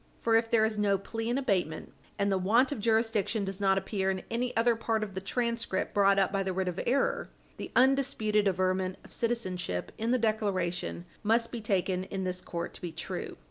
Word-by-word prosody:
For 225 Hz, -1 st, +2 dB
if 225 Hz, 0 st, +3 dB
there 225 Hz, -2 st, +4 dB
is 215 Hz, -1 st, -1 dB
no 200 Hz, -1 st, +3 dB
plea 225 Hz, +4 st, -4 dB
in 245 Hz, -, +1 dB
abatement, 185 Hz, -, -1 dB, 0.2 s
and 200 Hz, -1 st, +1 dB
the 190 Hz, -, +2 dB
want 230 Hz, +9 st, +3 dB
of 285 Hz, -, -3 dB
jurisdiction 220 Hz, -1 st, +1 dB
does 195 Hz, +1 st, -5 dB
not 195 Hz, -1 st, +3 dB
appear 195 Hz, 0 st, -1 dB
in 190 Hz, -1 st, -2 dB
any 245 Hz, +2 st, 0 dB
other 230 Hz, +1 st, +4 dB
part 225 Hz, -1 st, -1 dB
of 200 Hz, -2 st, -6 dB
the 190 Hz, -, -4 dB
transcript 235 Hz, -1 st, -1 dB
brought 200 Hz, -1 st, +4 dB
up 195 Hz, -1 st, +3 dB
by 195 Hz, 0 st, 0 dB
the 190 Hz, -1 st, -1 dB
writ 190 Hz, 0 st, -1 dB
of 180 Hz, 0 st, -2 dB
error, 270 Hz, +3 st, +1 dB, 0.3 s
the -, -, -6 dB
undisputed 255 Hz, -6 st, +3 dB
averment 185 Hz, 0 st, +1 dB
of -, -, -15 dB
citizenship 185 Hz, -, -2 dB
in 225 Hz, +1 st, -1 dB
the 255 Hz, -, +4 dB
declaration 200 Hz, -6 st, -1 dB, 0.2 s
must 230 Hz, +2 st, +2 dB
be 235 Hz, -, -5 dB
taken 190 Hz, -3 st, 0 dB
in 190 Hz, 0 st, -4 dB
this 180 Hz, 0 st, -3 dB
court 170 Hz, -1 st, -5 dB
to -, -, -11 dB
be 175 Hz, -, -4 dB
true. -, -, -5 dB
205 Hz, 210 wpm, -30 LUFS, 190-230 Hz, 0.3 s, there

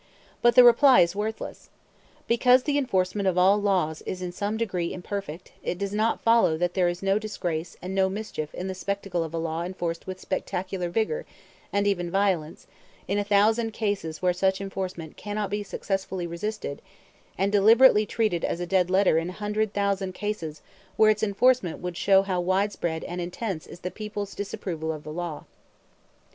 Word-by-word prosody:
But 240 Hz, 0 st, +4 dB
the 250 Hz, -, +10 dB
reply 250 Hz, +2 st, +7 dB
is 170 Hz, +2 st, +2 dB
worthless. 215 Hz, +2 st, -5 dB, 0.6 s
Because 250 Hz, +2 st, +4 dB
the 290 Hz, 0 st, +1 dB
enforcement 195 Hz, -5 st, 0 dB
of 185 Hz, -1 st, +1 dB
all 195 Hz, +3 st, +5 dB
laws 180 Hz, -6 st, 0 dB
is 185 Hz, -, -3 dB
in 180 Hz, -, -3 dB
some 205 Hz, +4 st, -2 dB
degree 185 Hz, -7 st, -2 dB
imperfect, 185 Hz, -2 st, -6 dB
it 175 Hz, -, -3 dB
does 200 Hz, +1 st, -3 dB
not 220 Hz, +2 st, 0 dB
follow 230 Hz, -8 st, +4 dB
that 175 Hz, +1 st, 0 dB
there 180 Hz, -2 st, +2 dB
is 175 Hz, +2 st, -5 dB
no 195 Hz, +1 st, +2 dB
disgrace 175 Hz, -6 st, -4 dB
and 185 Hz, +1 st, -4 dB
no 190 Hz, 0 st, +2 dB
mischief 190 Hz, -7 st, -5 dB
in 185 Hz, -, -4 dB
the 190 Hz, -, -3 dB
spectacle 195 Hz, -2 st, -2 dB
of 160 Hz, -, -6 dB
a 165 Hz, -, -4 dB
law 165 Hz, 0 st, -2 dB
enforced 175 Hz, -2 st, -4 dB
with 185 Hz, 0 st, -6 dB
spectacular 185 Hz, -1 st, -3 dB
vigor, 225 Hz, -, -1 dB, 0.4 s
and 200 Hz, 0 st, +1 dB
even 175 Hz, -4 st, 0 dB
violence, 180 Hz, -5 st, 0 dB, 0.4 s
in 200 Hz, +2 st, 0 dB
a -, -, +1 dB
thousand 215 Hz, +3 st, +2 dB
cases 195 Hz, -8 st, -3 dB
where 180 Hz, -1 st, +3 dB
such 190 Hz, +2 st, +1 dB
enforcement 185 Hz, -5 st, -5 dB
cannot 205 Hz, -1 st, -3 dB
be 205 Hz, 0 st, -1 dB
successfully 195 Hz, -2 st, -3 dB
resisted, 170 Hz, -2 st, -4 dB, 0.6 s
and 195 Hz, +2 st, +1 dB
deliberately 215 Hz, +2 st, +6 dB
treated 210 Hz, -7 st, 0 dB
as -, -, -1 dB
a 175 Hz, -, -2 dB
dead 180 Hz, 0 st, +2 dB
letter 185 Hz, -3 st, +4 dB
in 165 Hz, +2 st, -4 dB
a -, -, -7 dB
hundred 210 Hz, +1 st, -1 dB
thousand 200 Hz, -2 st, -1 dB
cases 170 Hz, -8 st, -4 dB, 0.3 s
where 215 Hz, 0 st, +6 dB
its 215 Hz, -, -2 dB
enforcement 220 Hz, -2 st, +2 dB
would 180 Hz, -1 st, -5 dB
show 195 Hz, +1 st, +4 dB
how 185 Hz, -2 st, -1 dB
widespread 185 Hz, -3 st, -1 dB
and 175 Hz, 0 st, -5 dB
intense 180 Hz, 0 st, -4 dB
is 175 Hz, -, -12 dB
the 180 Hz, -, -4 dB
people's 210 Hz, -2 st, -5 dB
disapproval 175 Hz, -5 st, -4 dB
of 155 Hz, -2 st, -7 dB
the 155 Hz, -, -7 dB
law. 170 Hz, -2 st, -5 dB
195 Hz, 180 wpm, -26 LUFS, 175-210 Hz, 0.6 s, the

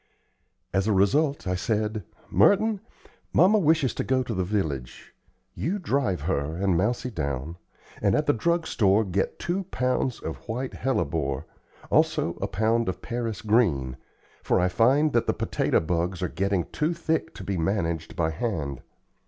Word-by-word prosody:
As 95 Hz, +2 st, +1 dB
a -, -, +3 dB
result, 140 Hz, +10 st, +2 dB
I 90 Hz, -, 0 dB
said: 105 Hz, +2 st, -1 dB, 0.3 s
"Merton, 210 Hz, 0 st, +4 dB, 0.5 s
mamma 195 Hz, +5 st, +5 dB
wishes 155 Hz, -, +3 dB
to -, -, -2 dB
go 130 Hz, 0 st, +1 dB
to 120 Hz, -, -4 dB
the 95 Hz, -2 st, 0 dB
village. 75 Hz, -, -3 dB, 0.4 s
You 185 Hz, +6 st, -2 dB
drive 140 Hz, -, 0 dB
her 70 Hz, +3 st, -1 dB
and 95 Hz, 0 st, +1 dB
Mousie 120 Hz, +8 st, 0 dB
down, 70 Hz, -, -3 dB, 0.4 s
and -, -, +3 dB
at -, -, +1 dB
the -, -, +3 dB
drug 170 Hz, +8 st, +1 dB
store 105 Hz, -3 st, +3 dB
get 95 Hz, +1 st, -1 dB
two 185 Hz, +2 st, -2 dB
pounds 130 Hz, -5 st, -1 dB
of -, -, -5 dB
white 125 Hz, +3 st, -3 dB
hellebore, 70 Hz, -, -1 dB, 0.5 s
also -, -, +2 dB
a -, -, 0 dB
pound 110 Hz, +2 st, +1 dB
of 95 Hz, -, -5 dB
Paris 115 Hz, -3 st, -3 dB
green, 85 Hz, -, +2 dB, 0.5 s
for -, -, +2 dB
I 90 Hz, +1 st, +2 dB
find 135 Hz, +11 st, +3 dB
that 120 Hz, -, +2 dB
the -, -, +2 dB
potato -, -, +1 dB
bugs 85 Hz, +2 st, -1 dB
are 90 Hz, -, 0 dB
getting 95 Hz, +1 st, 0 dB
too 160 Hz, +3 st, 0 dB
thick 160 Hz, -1 st, -1 dB
to -, -, -8 dB
be 100 Hz, -, -2 dB
managed 85 Hz, -3 st, -1 dB
by 80 Hz, -1 st, 0 dB
hand. 80 Hz, -, -3 dB
105 Hz, 160 wpm, -26 LUFS, 85-130 Hz, 0.5 s, mamma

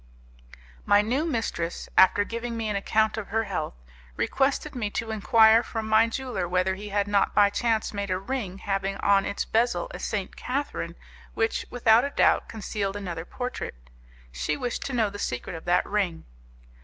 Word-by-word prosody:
My 205 Hz, 0 st, +4 dB
new 260 Hz, +9 st, 0 dB
mistress, 225 Hz, -, -2 dB
after 190 Hz, +2 st, +6 dB
giving 230 Hz, +2 st, -4 dB
me 225 Hz, -1 st, -2 dB
an 210 Hz, -, -1 dB
account 220 Hz, +2 st, +1 dB
of 210 Hz, -, -7 dB
her 225 Hz, +1 st, 0 dB
health, 180 Hz, -, -3 dB, 0.4 s
requested 280 Hz, +2 st, 0 dB
me 230 Hz, -6 st, -2 dB
to 225 Hz, +1 st, -3 dB
enquire 220 Hz, +1 st, +5 dB
from 225 Hz, -2 st, -5 dB
my 220 Hz, +1 st, +5 dB
jeweller 245 Hz, -7 st, -3 dB
whether 185 Hz, +1 st, +1 dB
he 205 Hz, +2 st, -7 dB
had 200 Hz, 0 st, 0 dB
not 205 Hz, -1 st, +1 dB
by 205 Hz, -1 st, +5 dB
chance 225 Hz, 0 st, 0 dB
made 200 Hz, -1 st, -3 dB
a 185 Hz, -, +1 dB
ring 195 Hz, -2 st, -4 dB
having 195 Hz, 0 st, -2 dB
on 200 Hz, -1 st, +3 dB
its 200 Hz, -, -2 dB
bezel 225 Hz, -6 st, 0 dB
a -, -, -6 dB
St. 200 Hz, -4 st, -3 dB
Catherine 280 Hz, +3 st, -3 dB, 0.4 s
which, 225 Hz, 0 st, 0 dB
without 235 Hz, -1 st, +4 dB
a 280 Hz, -, -1 dB
doubt, -, -, +2 dB
concealed 205 Hz, -2 st, -3 dB
another 175 Hz, -5 st, -5 dB
portrait; 250 Hz, -, -5 dB, 0.6 s
she 60 Hz, -, -2 dB
wished 245 Hz, -1 st, -3 dB
to 275 Hz, -, -5 dB
know 220 Hz, -4 st, +1 dB
the 205 Hz, -, -8 dB
secret 125 Hz, +1 st, -3 dB
of 160 Hz, -, -9 dB
that 175 Hz, +1 st, +3 dB
ring. 195 Hz, -5 st, -1 dB
210 Hz, 180 wpm, -26 LUFS, 195-230 Hz, 0.6 s, after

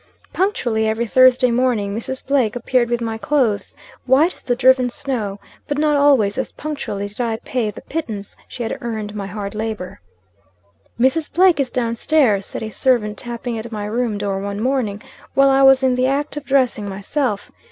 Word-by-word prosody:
"Punctually, 240 Hz, -, 0 dB
every 220 Hz, +2 st, -1 dB
Thursday 255 Hz, +1 st, +5 dB
morning, 235 Hz, -5 st, 0 dB
Mrs. 260 Hz, +4 st, -5 dB
Blake 260 Hz, -6 st, +1 dB
appeared 245 Hz, 0 st, +1 dB
with 240 Hz, 0 st, -1 dB
my 225 Hz, -1 st, -3 dB
clothes, 220 Hz, -4 st, 0 dB, 0.3 s
'white 290 Hz, +8 st, +4 dB
as -, -, -16 dB
the 245 Hz, -, -1 dB
driven 255 Hz, 0 st, +4 dB
snow;' 240 Hz, -7 st, -4 dB, 0.3 s
but, 290 Hz, -, -2 dB
not 300 Hz, 0 st, +2 dB
always, 270 Hz, -8 st, +3 dB
as -, -, -3 dB
punctually, 275 Hz, -9 st, -4 dB
did 210 Hz, +4 st, -7 dB
I 230 Hz, -2 st, -1 dB
pay 245 Hz, -4 st, -1 dB
the 210 Hz, -, -9 dB
pittance 220 Hz, -11 st, -5 dB
she 245 Hz, -, -6 dB
had 225 Hz, -, -3 dB
earned 215 Hz, -3 st, -4 dB
by 200 Hz, -2 st, -4 dB
hard 200 Hz, 0 st, -5 dB
labor. 215 Hz, -, -5 dB, 1.0 s
"'Mrs. 280 Hz, +6 st, +2 dB
Blake 360 Hz, -1 st, +4 dB
is 270 Hz, -3 st, +1 dB
down 235 Hz, -2 st, -1 dB
stairs,' 230 Hz, -8 st, +2 dB
said -, -, -6 dB
a 220 Hz, -, -5 dB
servant 210 Hz, -3 st, +1 dB
tapping 240 Hz, -1 st, -4 dB
at 230 Hz, +1 st, -8 dB
my 210 Hz, -2 st, -4 dB
room 225 Hz, 0 st, -1 dB
door, 200 Hz, -1 st, -2 dB
one 200 Hz, +1 st, -4 dB
morning, 230 Hz, -4 st, -1 dB, 0.3 s
while 275 Hz, 0 st, +5 dB
I 270 Hz, 0 st, +4 dB
was 270 Hz, 0 st, +6 dB
in 260 Hz, -1 st, +3 dB
the 250 Hz, +1 st, +1 dB
act 285 Hz, +3 st, -1 dB
of 295 Hz, -1 st, -6 dB
dressing 255 Hz, -7 st, +1 dB
myself. 205 Hz, +3 st, -2 dB
240 Hz, 185 wpm, -20 LUFS, 210-265 Hz, 1.0 s, was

